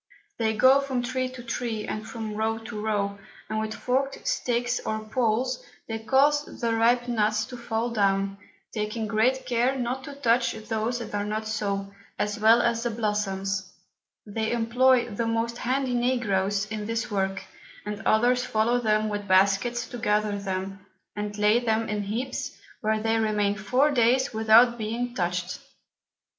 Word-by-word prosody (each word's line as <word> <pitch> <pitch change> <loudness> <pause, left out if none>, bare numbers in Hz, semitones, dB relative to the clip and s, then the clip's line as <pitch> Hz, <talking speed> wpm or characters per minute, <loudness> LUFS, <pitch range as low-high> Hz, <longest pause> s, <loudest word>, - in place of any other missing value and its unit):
They 220 -1 0
go 260 +4 +6
from 260 -3 -2
Tree 255 +1 -1
to 255 -1 -10
Tree, 230 -2 -3
and 215 +1 -5
from 225 -2 -5
Row 220 +1 0
to 220 -1 -7
Row, 200 -2 -1 0.3
and 215 0 -2
with 220 0 -3
forked 270 +2 -1
Sticks 245 0 0
or 215 - -2
Poles, 240 +3 0 0.2
they 225 -1 -3
cause 280 +6 +3 0.2
the 235 -2 0
ripe 240 +2 +3
Nuts 215 -2 +1
to 250 - -9
fall 235 0 -2
down, 195 -2 +1 0.3
taking 215 +1 -2
great 250 +5 +1
care 250 +2 +1
not 255 +1 -2
to 285 - -8
touch 245 -3 +2
those 220 +2 -2
that 235 - -7
are 205 0 0
not 215 +1 -3
so, 200 -2 -2 0.2
as 210 +1 -2
well 225 +2 +6
as 235 -1 +1
the 240 - -1
Blossoms: 195 -4 -2 0.5
They 220 +1 -2
employ 240 +2 +3
the 230 +3 -2
most 230 +1 -1
handy 260 +1 0
Negroes 205 -5 +1
in 210 -1 -4
this 230 0 -2
Work, 195 -1 -1 0.4
and 210 -1 -4
others 245 +3 +3
follow 230 +2 +1
them 215 -2 +1
with 205 -1 -4
Baskets 200 +6 +3
to 245 - -7
gather 210 -1 +1
them, 190 0 -4 0.3
and 210 0 -4
lay 210 +3 +4
them 225 -2 0
in 210 -1 -2
Heaps, 225 +6 -4 0.2
where 215 0 0
they 225 +1 +1
remain 210 -2 +1
four 250 +8 +2
Days 250 0 +3
without 225 +2 +5
being 235 +3 -3
touch'd. 180 -3 -2
225 Hz, 165 wpm, -26 LUFS, 210-245 Hz, 0.5 s, go